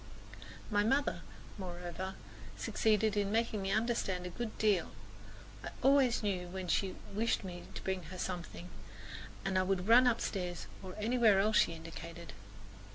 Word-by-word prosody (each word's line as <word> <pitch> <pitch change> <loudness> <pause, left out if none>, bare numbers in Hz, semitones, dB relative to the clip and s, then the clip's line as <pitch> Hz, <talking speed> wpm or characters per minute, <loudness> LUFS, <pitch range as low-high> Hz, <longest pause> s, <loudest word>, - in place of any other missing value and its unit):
My 205 0 +3
mother, 270 +6 +1 0.4
moreover, 180 +1 -5 0.4
succeeded 215 -1 +2
in 205 -1 +1
making 225 -2 +1
me 195 - -2
understand 215 -4 0
a 180 - -5
good 230 +3 -5
deal. 205 -5 +2 0.7
I - - -4
always 270 -4 +4
knew 185 -4 -1
when 185 0 -5
she 185 +4 +1 0.2
wished 225 +2 +1
me 175 -2 -7
to - - -6
bring 190 -1 -1
her 185 +4 -8
something, 180 -1 -5 0.8
and 190 -1 +2
I - - +4
would 185 0 0
run 245 +3 +7
upstairs 180 -7 -1 0.2
or 185 -1 -8
anywhere 220 -2 +4
else 210 +2 +3
she 170 - +3
indicated. 165 +1 -9
195 Hz, 150 wpm, -34 LUFS, 180-220 Hz, 0.8 s, run